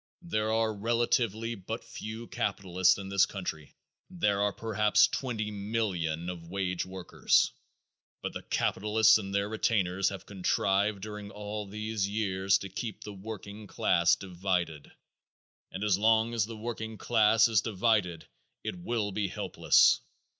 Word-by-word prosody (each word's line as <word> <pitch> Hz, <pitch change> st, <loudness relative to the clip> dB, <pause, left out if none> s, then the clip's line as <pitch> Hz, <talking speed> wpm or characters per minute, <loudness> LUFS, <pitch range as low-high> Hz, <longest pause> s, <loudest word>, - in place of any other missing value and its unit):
There 110 Hz, -11 st, -1 dB
are 110 Hz, 0 st, +1 dB
relatively 115 Hz, +1 st, 0 dB
but 110 Hz, +2 st, -6 dB
few 110 Hz, 0 st, -7 dB
capitalists 95 Hz, -6 st, +1 dB
in 95 Hz, -1 st, -7 dB
this 100 Hz, -1 st, +4 dB
country; 80 Hz, -6 st, -6 dB, 0.3 s
there 105 Hz, -, 0 dB
are 105 Hz, 0 st, +2 dB
perhaps 105 Hz, 0 st, +3 dB
twenty 110 Hz, -5 st, -3 dB
millions 100 Hz, -6 st, -2 dB
of 85 Hz, -2 st, -6 dB
wage 90 Hz, -1 st, -2 dB
workers, 95 Hz, -1 st, +1 dB, 0.7 s
but -, -, -3 dB
the -, -, -5 dB
capitalists 110 Hz, +2 st, +3 dB
and 100 Hz, -2 st, -6 dB
their 100 Hz, 0 st, 0 dB
retainers 100 Hz, -4 st, +1 dB
have 100 Hz, -3 st, -8 dB
contrived 100 Hz, +1 st, 0 dB
during 105 Hz, -1 st, -7 dB
all 105 Hz, 0 st, -6 dB
these 110 Hz, 0 st, -2 dB
years 100 Hz, -2 st, +1 dB
to 100 Hz, -, -7 dB
keep 110 Hz, +3 st, -6 dB
the 105 Hz, -, -7 dB
working 105 Hz, +1 st, -8 dB
class 85 Hz, -1 st, +3 dB
divided, 90 Hz, -5 st, -3 dB, 0.8 s
and 95 Hz, -, -5 dB
as 100 Hz, -2 st, +2 dB
long 110 Hz, +2 st, +3 dB
as 110 Hz, -3 st, +1 dB
the 115 Hz, -1 st, -8 dB
working 110 Hz, -1 st, -5 dB
class 110 Hz, 0 st, +4 dB
is 110 Hz, -4 st, +3 dB
divided 105 Hz, -6 st, 0 dB, 0.4 s
it 90 Hz, -, -4 dB
will 105 Hz, +2 st, -2 dB
be 100 Hz, +1 st, -1 dB
helpless. -, -, +3 dB
105 Hz, 140 wpm, -30 LUFS, 95-110 Hz, 0.8 s, this